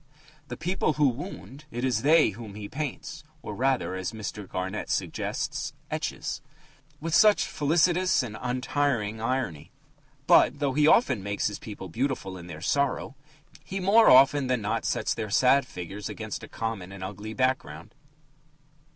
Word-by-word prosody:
The 120 -2 -6
people 175 -2 0
who 150 -1 +3
wound 145 +1 -8
it 120 +1 -3
is 125 -4 +1
they 155 +3 +5
whom 105 -1 -9
he 105 -1 -6
paints 150 +4 -5 0.2
(or, - - -5
rather, 130 -3 0
as 95 +3 -4
Mr. 105 -2 -6
Garnett 95 +3 -4
suggests, - - -2 0.2
etches) - - -3 0.6
with 165 +1 -4
such 210 +3 +5
felicitous 175 +3 +2
and 110 -4 -6
untiring 125 -3 -1
irony. 115 - -2 0.6
But, - - +5
though 140 -2 0
he 150 +2 +4
often 130 - +4
makes 100 +1 -2
his 105 - -2
people 105 -3 -8
beautiful 115 -1 -2
in 90 -1 -10
their 80 -3 -8
sorrow, 140 +6 0 0.5
he 195 - -4
more 205 +5 +6
often 135 +1 +6
than 125 -1 +1
not 110 +3 -1
sets - - 0
their 110 - -4
sad 130 +5 +4
figures 95 +2 -7
against - - -6
a - - -9
common 110 -5 -4
and 100 -1 -8
ugly 105 +3 -6
background. 130 +3 -1
125 Hz, 155 wpm, -27 LUFS, 105-145 Hz, 0.6 s, more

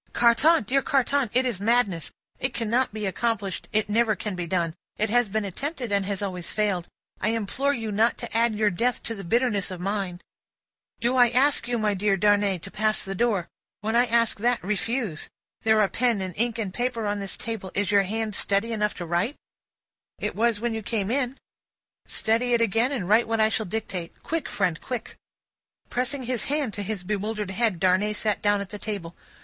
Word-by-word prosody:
"Carton! 240 +6 +5
Dear 270 +6 +2
Carton! 275 -1 +1
It 255 +2 +2
is 235 -7 -1
madness. 205 -6 +1 0.3
It 260 - -2
cannot 235 +3 +1
be 215 0 -4
accomplished, 200 -1 -2
it 215 0 +2
never 220 +1 +2
can 210 +1 -4
be 175 -1 -4
done, 170 -2 0 0.2
it 215 0 0
has 245 -2 +3
been 215 +1 -1
attempted, 255 - -4
and 200 -1 +1
has 200 0 -2
always 180 -3 -3
failed. 200 -5 0 0.3
I 210 - +1
implore 230 +5 0
you 225 -2 -4
not 220 +3 +2
to 235 -2 -7
add 230 -1 +3
your 210 -1 +2
death 235 +7 0
to 230 - -3
the 200 -3 -7
bitterness 215 +1 +1
of 185 -2 -6
mine." 195 -2 -2 0.8
"Do 240 +3 +1
I 245 -1 +7
ask 260 +1 +3
you, 245 -1 0
my 215 -2 +1
dear 200 0 +1
Darnay, 205 -1 +3
to 195 - -8
pass 215 0 0
the 195 - -3
door? 200 -4 +1 0.3
When 220 +2 -1
I 245 +1 +4
ask 230 -2 +2
that, 240 +2 +1
refuse. 210 - -2 0.3
There 220 -1 +4
are 205 - +4
pen 235 0 +1
and 185 -1 -4
ink 235 +1 +1
and 205 -5 -3
paper 240 -1 -1
on 205 0 -1
this 195 -1 -3
table. 225 -5 -5
Is 205 0 +2
your 200 -1 +6
hand 215 +2 -2
steady 200 +3 +1
enough 210 -2 0
to 175 - -5
write?" 175 - 0 0.8
"It - - -3
was 230 -1 +2
when 235 +1 -1
you 220 - -3
came 210 -1 -1
in." 260 0 0 0.7
"Steady 235 +3 +1
it 235 - +1
again, 230 +4 +2
and 230 -11 -2
write 220 +4 +4
what 225 0 0
I 220 0 +5
shall 220 -1 -1
dictate. 185 -4 -5
Quick, 325 -3 -2
friend, 180 -5 0
quick!" 250 -2 -5 0.8
Pressing 255 +2 -1
his 245 -1 0
hand 285 -6 -1
to 205 - -4
his 200 -2 -4
bewildered 210 +1 -2
head, 215 -3 0
Darnay 190 +3 +3
sat 210 0 0
down 205 -1 +2
at 200 - -6
the 210 - -6
table. 195 -6 -5
215 Hz, 205 wpm, -26 LUFS, 200-235 Hz, 0.8 s, I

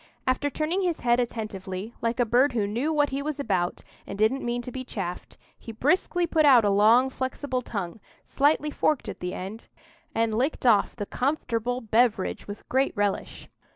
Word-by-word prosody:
After 260 +3 +1
turning 315 +6 -1
his 350 -3 -1
head 240 0 +3
attentively, 215 -3 -4
like 230 +1 -1
a 245 - +4
bird 245 +5 +3
who 220 -4 +1
knew 240 +10 -1
what 295 -2 +2
he 275 +1 -2
was 300 0 -4
about 185 -10 -1 0.2
and 195 - -6
didn't 220 +6 +2
mean 240 0 -2
to 250 - -7
be 255 +1 -5
chaffed, 190 -7 -6 0.2
he 230 - -8
briskly 345 - +1
put 320 -2 +2
out 255 -7 +7
a 205 - +3
long, 225 +6 +5
flexible 260 0 -3
tongue, 200 -5 -5 0.2
slightly 295 +2 +1
forked 300 -1 0
at - - -6
the 180 0 -4
end, 200 +5 -7 0.5
and 225 -1 +1
licked 260 +5 -1
off 215 -5 +4
the 205 - -4
comfortable 245 -2 -1
beverage 225 -3 +1
with 205 0 -9
great 265 +2 +1
relish. 205 -1 -2
240 Hz, 185 wpm, -26 LUFS, 215-275 Hz, 0.5 s, out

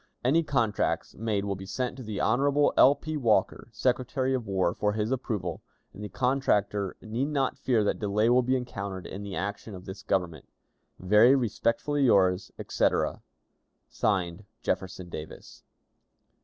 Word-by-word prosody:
Any 150 +6 +4
contracts 120 -9 0
made 105 -2 -2
will 100 - -1
be 95 0 -8
sent 125 +5 -3
to - - -8
the 110 -4 -5
Hon. 140 +5 +3
L. 140 +2 +7
P. 155 +1 -5
Walker, 110 -8 +1
Secretary 130 +2 0
of 125 -5 -2
War, 95 -3 +1
for 105 0 0
his 110 +2 -1
approval; 105 -9 -3 0.3
and 105 - -9
the 105 - -5
contractor 105 -4 0
need 115 +5 -2
not 140 -3 0
fear 120 -5 +1
that 105 - 0
delay 105 +1 +1
will 125 +1 +5
be 130 +2 +1
encountered 100 -6 -5
in 95 - -7
the 100 -2 -6
action 100 +1 -4
of 90 - -11
this 95 +1 -8
Government. 90 -6 -2 0.5
"Very 105 +8 +5
respectfully 130 +4 0
yours, 95 -4 +3
etc., - - 0 0.7
(Signed) 95 -2 -1 0.2
"Jefferson 90 -1 -3
Davis." 80 -2 -9
105 Hz, 155 wpm, -28 LUFS, 95-130 Hz, 0.7 s, L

